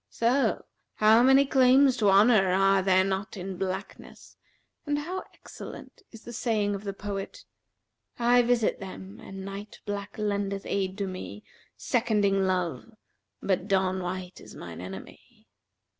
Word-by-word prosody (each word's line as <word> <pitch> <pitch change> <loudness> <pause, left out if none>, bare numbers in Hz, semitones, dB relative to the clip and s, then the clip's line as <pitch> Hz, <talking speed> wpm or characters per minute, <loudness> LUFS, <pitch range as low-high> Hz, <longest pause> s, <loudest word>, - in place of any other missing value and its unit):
So, 235 0 +1 0.3
how 220 +2 +5
many 265 +2 +6
claims 265 0 +5
to 210 -3 +3
honour 200 0 +5
are 195 0 +4
there 190 0 +4
not 195 +2 -3
in 190 +1 -5
blackness 190 +1 -6 0.5
and 290 -1 -1
how 355 +6 -4
excellent - - -11
is 225 -2 -14
the 240 - -9
saying 215 -3 0
of 200 +1 -6
the 200 - -2
poet, 200 -1 -6 0.7
'I 245 +1 +4
visit 240 -2 +1
them, 190 0 -9
and 195 0 -9
night 200 +2 -8
black 205 0 -5
lendeth 200 -2 -2
aid 190 -1 -2
to 200 - -2
me 185 +3 -7 0.2
* - - -34
Seconding 205 -5 +2
love, 185 +4 -2 0.5
but 190 0 0
dawn 190 -2 +1
white 180 0 -6
is - - -13
mine 85 0 -9
enemy.' 95 +1 -11
200 Hz, 145 wpm, -27 LUFS, 190-230 Hz, 0.7 s, many